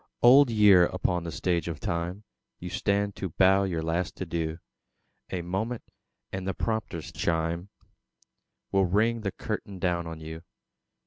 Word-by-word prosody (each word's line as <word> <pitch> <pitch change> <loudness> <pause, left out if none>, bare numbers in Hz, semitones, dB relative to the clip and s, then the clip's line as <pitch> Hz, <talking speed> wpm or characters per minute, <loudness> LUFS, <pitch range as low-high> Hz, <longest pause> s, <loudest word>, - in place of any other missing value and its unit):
Old 130 +2 +8
Year! 100 -5 +6
upon 90 -2 -1
the 85 - -4
Stage 85 -1 -1
of 80 -2 -4
Time 85 +4 -3 0.3
You 90 0 -7
stand 100 +2 0
to 95 - -3
bow 95 +3 +4
your 85 -4 -2
last 85 +2 -2
adieu; 80 -3 -2 0.7
A 90 -2 -2
moment, 110 +7 -3 0.5
and 95 0 -4
the 95 - -1
prompter's 110 -7 -3
chime 85 +3 -1 1.0
Will 95 -1 +3
ring 110 +5 +2
the 100 -2 -2
curtain 100 +1 -5
down 85 -1 -1
on 80 -1 -7
you. 80 +1 -8
90 Hz, 145 wpm, -28 LUFS, 85-100 Hz, 1.0 s, Old